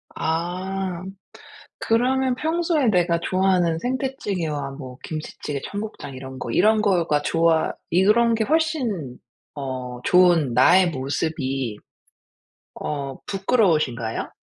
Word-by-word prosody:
아. 180 +2 -2 0.8
그러면 255 +3 +1
평소에 320 0 0
내가 175 -4 +2
좋아하는 185 -2 +1
생태찌개와 190 - -3
뭐 130 -2 -9
김치찌개, 155 -2 -5
청국장 205 -9 -6
이런 130 0 -8
거 120 - -5
"이런 215 - +3
거가 170 -7 +2
좋아." 165 0 +2 0.2
이런 215 +7 +4
게 220 -1 +1
훨씬 250 - -1 0.4
어 130 -3 -5
좋은 175 -7 +4
나의 175 +8 +5
모습이 135 -4 -2 1.0
어 140 -2 -4
부끄러우신가요? 160 - 0
175 Hz, 235 characters per minute, -23 LUFS, 140-215 Hz, 1.0 s, 나의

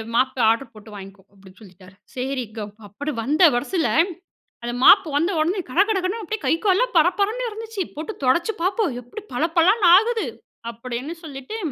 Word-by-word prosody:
மாப்பே 260 +1 +1
order 230 +1 -1
போட்டு 215 0 -14
வாங்கிக்கோ" 195 -1 -11
அப்படின்னு 190 0 -18
சொல்லிட்டாரு. 185 -1 -16 0.2
செரிங்க 250 -4 -4 0.3
அப்படி 285 +9 -5
வந்த 300 +7 0
வெரசுல, 320 +7 -1 0.7
அந்த 240 0 -3
மாப்பு 390 -6 +7
வந்த 335 +6 +1
உடனே 355 +6 0
கடகடகடன்னு 395 - +1
அப்படியே 435 0 -5
கை - - +3
கால்லாம் 405 +3 +2
பரபரன்னு 400 +9 +1
இருந்துச்சு. 445 -2 -6
போட்டு 320 +8 -6
தொடச்சு 340 +11 +2
பாப்போம் 375 - 0
எப்படி 330 - -10
பள 245 +6 -1
பளன்னு 380 +3 +4
ஆகுது 450 +2 0 0.5
அப்படின்னு 250 +6 -6
சொல்லிட்டு, 280 +7 -7
315 Hz, 150 wpm, -22 LUFS, 240-400 Hz, 0.7 s, மாப்பு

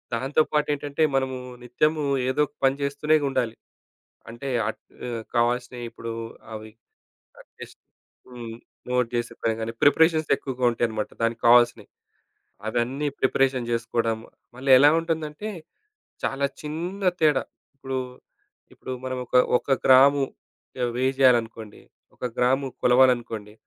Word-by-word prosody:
దాంతో 135 +6 +1
పాటు 150 -1 +1
ఏంటంటే 145 +1 -2
మనము 130 -1 0 0.3
నిత్యము 150 +5 0 0.3
ఏదోక 150 +2 +1
పని 135 0 +4
జేస్తూనే 140 +2 +1
ఉండాలి. 120 -4 -1 0.8
అంటే 120 +4 -7 0.2
ఆహ్, 115 +1 -6
కావాల్సినవి 120 +1 0
ఇప్పుడు 115 0 -7 0.4
అవి 110 0 -8 0.9
టేస్ట్ - - -11 0.5
హ్మ్ 120 -2 -8 0.4
నోట్ 125 -1 +1
జేసుకొడము 120 -1 -2
గాని 110 +1 -3
ప్రిపరేషన్స్ 160 +1 +4
ఎక్కువగా 130 -2 -4
ఉంటాయన్నమాట. 110 -2 -2
దానికి 115 0 0
కావాల్సినయి. 120 -3 +4 0.8
అవన్నీ 125 +6 -1
ప్రిపరేషన్ 130 -2 +1
జేసుకోవడం 115 -1 -1 0.4
మళ్ళీ 135 +2 -2
ఎలా 145 +3 +7
ఉంటుందంటే 160 +3 -4 0.8
చాలా 140 +1 0 0.2
చిన్న 170 +6 -5 0.2
తేడా. 150 -3 +3 0.3
ఇప్పుడు, 135 -1 -5 0.8
ఇప్పుడు - - -9
మనం 130 0 -3
ఒక 120 - -6 0.2
ఒక - - -15 0.2
గ్రాము 135 +2 +6 0.7
వేయ్ 130 +1 +1
జేయాలనుకోండి 115 -4 +2 0.3
ఒక - - -6
గ్రాము 130 +2 +2 0.2
కొలవాలనుకోండి 120 -4 +2
130 Hz, 110 wpm, -24 LUFS, 120-140 Hz, 0.9 s, ఎలా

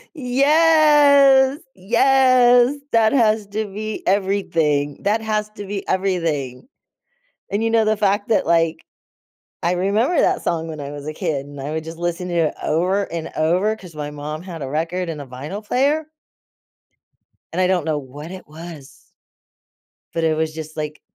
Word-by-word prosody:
Yes, 280 -1 +5 0.2
yes. 250 +4 +4 0.2
That 225 -1 +3
has 220 -5 +2
to 215 +2 -3
be 215 +2 -6
everything. 165 -7 0
That 210 +3 +1
has 215 -1 -2
to 205 - -7
be 195 0 -5
everything. 165 - -2 0.8
And 205 +3 -1
you 225 - 0
know 225 -1 +3
the 215 0 +1
fact 205 0 +1
that, 220 - +2
like, 165 -1 +1 0.8
I 170 +1 +1
remember 205 - +1
that - - +2
song 165 -1 -2
when 155 -2 -7
I 140 -1 -6
was 145 0 -8
a 155 - -4
kid, 155 -5 -3
and 145 -1 -10
I 140 +2 -5
would 160 0 -3
just 165 +1 -9
listen 175 +1 -3
to - - -4
it - - -7
over 185 +6 +1
and 165 -1 -4
over, 180 +7 +1
'cause 180 -6 -13
my 150 -1 -5
mom 150 +1 -6
had 175 -3 -8
a 135 - -5
record 165 +4 -2
and 155 -3 -5
a - - -8
vinyl 145 - -7
player 285 +7 +1 1.5
and 180 - 0
I 185 - +3
don't 180 -4 0
know 155 -2 -1
what 145 +4 -10
it 185 -1 -10
was 155 -2 -12 1.0
but 165 - -1
it 160 -1 +2
was 160 0 -1
just 155 0 -8
like 150 0 -5
185 Hz, 170 wpm, -20 LUFS, 155-220 Hz, 1.5 s, Yes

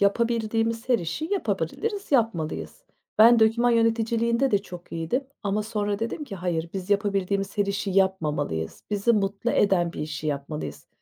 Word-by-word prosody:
yapabildiğimiz 225 +2 +1
her 245 -2 +4
işi 175 - -3
yapabiliriz, 405 0 -2
yapmalıyız. 155 - 0 0.3
Ben 230 +2 +8
doküman 230 +2 +4
yöneticiliğinde 230 +2 +2
de 205 - +4
çok 180 -3 -11
iyiydim 165 +12 -1 0.2
ama 205 +1 0
sonra 205 -2 -2
dedim 230 +7 -3
ki 215 -8 -7
hayır, 170 -2 -2
biz 190 +1 -5
yapabildiğimiz 200 -1 0
her 205 - +3
işi 200 0 -2
yapmamalıyız. 165 - 0
Bizi 210 +3 +2
mutlu 205 +2 0
eden 180 -6 +2
bir - - -6
işi 155 0 -4
yapmalıyız. 140 - -4
205 Hz, 145 wpm, -25 LUFS, 175-230 Hz, 0.3 s, Ben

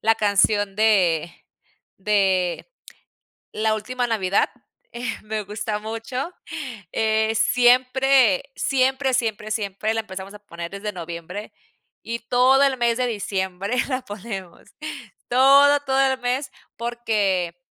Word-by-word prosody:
la 225 +1 +3
canción 205 -1 +2
de 180 -7 +3 0.7
de 190 - +1 0.8
la 215 0 +1
última 245 +3 -2
navidad, 200 -4 +1 0.4
eh, 240 +1 -7 0.2
me 215 0 -3
gusta 210 +1 -4
mucho, 225 +8 -5 0.6
eh, 220 0 +1
siempre, 255 0 +4
siempre, 265 0 +1
siempre, 220 -3 -1
siempre, 215 0 -2
la 225 - 0
empezamos 190 -1 -8
a - - -9
poner 170 -4 -8
desde 200 +2 -5
noviembre, 175 +3 -7 0.5
y 235 +1 -4
todo 255 +2 +5
el 275 -1 +2
mes 235 -1 +2
de 250 - +1
diciembre 195 -1 -2
la 255 -2 -2
ponemos 200 -5 -8 0.7
todo, 275 +3 +6
todo 270 -1 0
el 260 - -3
mes. 255 +3 -1 0.3
Porque 210 -7 -1
220 Hz, 120 wpm, -23 LUFS, 200-250 Hz, 0.8 s, todo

